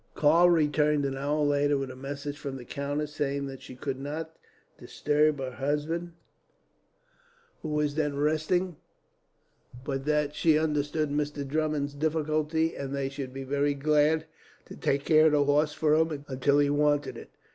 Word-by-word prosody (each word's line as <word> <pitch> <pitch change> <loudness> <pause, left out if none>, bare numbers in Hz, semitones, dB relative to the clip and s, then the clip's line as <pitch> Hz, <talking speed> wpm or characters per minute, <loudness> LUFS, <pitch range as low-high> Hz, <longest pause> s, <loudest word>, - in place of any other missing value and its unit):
Karl 165 +4 +5
returned 150 -3 +2
an 135 -1 -2
hour 145 +2 0
later 145 0 +2
with 135 -1 -4
a - - -10
message 140 +2 -6
from 140 -2 -5
the 125 - -10
countess, 145 +3 -3
saying 140 -1 -2
that 135 -1 -8
she 130 - -10
could 135 +1 -4
not 160 +3 -5 0.4
disturb 150 0 +1
her 130 -1 -4
husband, 150 +6 -2 1.5
who 155 - -5
was 150 -1 0
then 150 -2 -1
resting, 155 +4 0 1.1
but 135 -1 -3
that 150 -1 +1
she 155 0 +3
understood 150 -1 0
Mr. 145 -1 -2
Drummond's 150 -1 -1
difficulty, 155 +1 0
and 140 0 -4
they 135 -1 -2
should 135 -2 -6
be 135 +1 -6
very 145 +1 0
glad 150 +2 +2 0.4
to - - -10
take 140 0 -1
care 155 0 +6
of 155 - +2
the 145 -1 +4
horse 145 +2 +2
for 155 -1 +2
him, 155 -2 +1
until 135 +2 +1
he 145 0 +4
wanted 145 0 +1
it. - - -10
145 Hz, 165 wpm, -28 LUFS, 140-155 Hz, 1.5 s, care